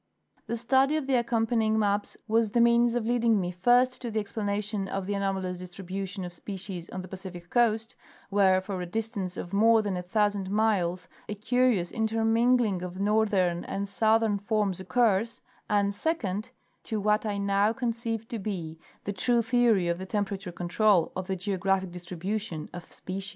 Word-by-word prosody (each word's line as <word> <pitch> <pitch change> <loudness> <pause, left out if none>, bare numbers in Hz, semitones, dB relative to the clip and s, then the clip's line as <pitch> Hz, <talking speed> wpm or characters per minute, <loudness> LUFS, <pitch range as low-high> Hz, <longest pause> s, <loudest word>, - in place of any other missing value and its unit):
The 235 - -2
study 265 +5 +3
of 305 - -2
the 270 - -1
accompanying 225 -2 +1
maps 205 -1 0
was 225 0 +2
the 235 - +1
means 235 0 +4
of 240 -2 -1
lead 240 +1 +1
_ - - -6
ing 225 -3 +4
me, 180 -1 -2
first, 245 +8 +3
to 240 - -4
the 220 -1 -1
explanation 205 -1 -2
of 195 0 -3
the 205 - -2
anomalous 190 -2 -2
distribution 185 +1 -6
of 175 - -8
species 185 -1 -7
on 185 - -6
the - - -9
Pacific 185 -2 -9
coast, 225 -1 +1 0.4
where 190 -2 +4
for 190 -1 -5
a 180 - -4
distance 200 -2 -3
of 175 - -6
more 220 +2 +5
than 200 -3 -2
a 180 - -2
thousand 205 +1 0
miles 190 -4 +1 0.2
a 210 - -3
curious 225 -4 +1
intermingling 225 -1 +2
of 180 +1 -6
northern 200 -4 +2
and 200 +1 -3
southern 220 0 +2
forms 205 -3 0
occurs; 225 +2 +1 0.3
and, 200 -1 +2
second, 210 - -2 0.3
to 220 - -3
what 210 +1 +2
I 210 -2 -2
now 200 +1 +2
conceive 230 -2 -3
to 230 - -4
be 170 -6 -5 0.2
the 205 - -3
true 235 +4 +2
theory 230 -6 +3
of 170 +1 -1
the 190 - -6
temperature 200 -2 -3
control 175 +1 +2
of 185 0 -4
the 190 - -1
geographic 190 -1 -1
distribution 180 0 -5
of 175 -1 -9
species. 195 +1 -6
205 Hz, 175 wpm, -28 LUFS, 185-225 Hz, 0.4 s, more